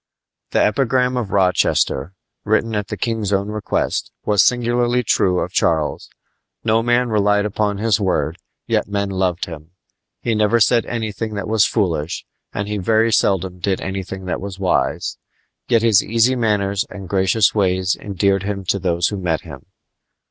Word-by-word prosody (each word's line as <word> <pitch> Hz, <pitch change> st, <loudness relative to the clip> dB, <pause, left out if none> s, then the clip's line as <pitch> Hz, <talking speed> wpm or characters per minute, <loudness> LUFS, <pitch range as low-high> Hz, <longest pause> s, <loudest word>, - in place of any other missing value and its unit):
The -, -, +2 dB
epigram 125 Hz, +2 st, +1 dB
of 120 Hz, -5 st, -2 dB
Rochester, 90 Hz, -4 st, +1 dB, 0.3 s
written 110 Hz, +1 st, +1 dB
at 105 Hz, -2 st, -2 dB
the -, -, -5 dB
king's 115 Hz, -4 st, -2 dB
own 100 Hz, +1 st, 0 dB
request, 105 Hz, -1 st, -2 dB, 0.2 s
was 105 Hz, -2 st, +4 dB
singularly 120 Hz, 0 st, +2 dB
true 90 Hz, -4 st, +2 dB
of -, -, -2 dB
Charles. 80 Hz, -2 st, 0 dB, 0.5 s
No 115 Hz, 0 st, +2 dB
man 120 Hz, +1 st, +2 dB
relied 105 Hz, -1 st, +2 dB
upon 105 Hz, 0 st, -1 dB
his 110 Hz, 0 st, +1 dB
word, 85 Hz, -3 st, -1 dB, 0.3 s
yet -, -, 0 dB
men 100 Hz, -1 st, -2 dB
loved 95 Hz, -2 st, -1 dB
him. 80 Hz, 0 st, -10 dB, 0.5 s
He 115 Hz, -, -1 dB
never 110 Hz, +2 st, +2 dB
said 115 Hz, +2 st, +3 dB
anything 110 Hz, -1 st, -3 dB
that 100 Hz, -, -4 dB
was 110 Hz, -1 st, +3 dB
foolish, 85 Hz, -8 st, -1 dB, 0.3 s
and 100 Hz, 0 st, -3 dB
he 105 Hz, 0 st, -2 dB
very 110 Hz, +4 st, +2 dB
seldom 95 Hz, -2 st, +1 dB
did 95 Hz, +1 st, -1 dB
anything 95 Hz, 0 st, -5 dB
that 90 Hz, -, -3 dB
was 100 Hz, -1 st, -6 dB
wise; 95 Hz, -2 st, -1 dB, 0.5 s
yet 115 Hz, -2 st, +3 dB
his 110 Hz, -4 st, +5 dB
easy 115 Hz, +3 st, +2 dB
manners 100 Hz, -4 st, 0 dB
and 95 Hz, -2 st, -9 dB
gracious 95 Hz, +2 st, +2 dB
ways 95 Hz, -2 st, +1 dB
endeared 100 Hz, -1 st, 0 dB
him 100 Hz, 0 st, -3 dB
to 100 Hz, -, +2 dB
those 85 Hz, -2 st, +1 dB
who 105 Hz, -, -4 dB
met 90 Hz, -4 st, -1 dB
him. -, -, -11 dB
100 Hz, 165 wpm, -19 LUFS, 95-110 Hz, 0.5 s, his